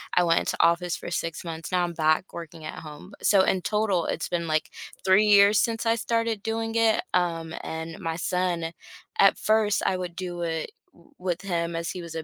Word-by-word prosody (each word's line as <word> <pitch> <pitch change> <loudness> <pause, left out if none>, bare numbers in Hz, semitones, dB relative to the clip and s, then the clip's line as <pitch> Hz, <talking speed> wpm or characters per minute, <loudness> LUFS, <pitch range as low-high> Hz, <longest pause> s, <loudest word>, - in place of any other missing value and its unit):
I 180 - +5
went 165 -1 +3
into - - -2
office 175 +1 +2
for - - -7
6 165 -1 -3
months. 165 -1 -6
Now 180 -1 +2
I'm 175 - -1
back 155 +3 +1
working 165 -1 -9
at 155 - -6
home. 155 +4 -11
So 200 -2 +5
in 190 -1 +1
total, 205 -4 0
it's - - -3
been, 170 -1 -2
like, 155 0 0 0.3
3 190 +3 +5
years 205 0 +6
since 230 0 0
I 230 0 +3
started 230 -2 -1
doing 225 0 -2
it. 225 -1 +3
Um, 165 -2 0
and 160 0 -6
my 165 0 -3
son, 175 -1 -1 0.5
at 195 - +6
first, 215 -1 +2
I 185 - +1
would 180 -2 -5
do 175 -2 -5
it 165 - -3 0.2
w - - -23
with 180 -1 -2
him 170 -3 -2
as 165 0 -3
he 180 - -6
was 170 -1 -8
a 160 - -3
180 Hz, 210 wpm, -26 LUFS, 165-205 Hz, 0.5 s, years